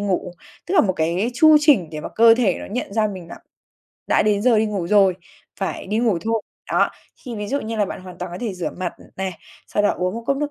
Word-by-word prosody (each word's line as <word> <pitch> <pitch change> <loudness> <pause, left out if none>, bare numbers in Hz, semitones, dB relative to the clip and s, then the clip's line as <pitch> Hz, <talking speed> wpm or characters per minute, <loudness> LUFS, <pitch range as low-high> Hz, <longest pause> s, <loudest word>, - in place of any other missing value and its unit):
ngủ, 190 -3 -1 0.3
tức 370 - -2
là - - +7
một 190 -4 +1
cái 175 +8 0
chu 310 +2 +7
trình 265 - +4
để 155 -1 -6
mà - - -6
cơ 230 0 +7
thể 225 -7 +2
nó - - -7
nhận 215 -1 -4
ra 220 -1 +2
mình 185 -4 -8
đã - - -9 0.7
đã - - +4
đến 205 -1 +1
giờ 235 -3 +4
đi 220 - +2
ngủ 200 -5 -3
rồi, 195 -2 +4 0.5
phải 190 - -3
đi 215 +3 -1
ngủ 225 -7 +2
thôi. 225 -2 0 0.3
Đó, - - +3 0.3
thì 245 -4 -6
ví 210 0 -4
dụ 280 - -1
như 225 +1 -4
là 210 - +2
bạn - - -6
hoàn 180 -1 -11
toàn 180 -1 -5
có 180 - -6
thể 225 -5 -3
rửa 180 -2 -3
mặt 180 -1 -3 0.2
này, 190 -1 -2 0.4
sau 205 - 0
đó 205 - +4
uống 180 +2 -2
một 230 - -5
cốc 275 - +1
nước 295 +1 -2
205 Hz, 265 wpm, -21 LUFS, 185-230 Hz, 0.7 s, là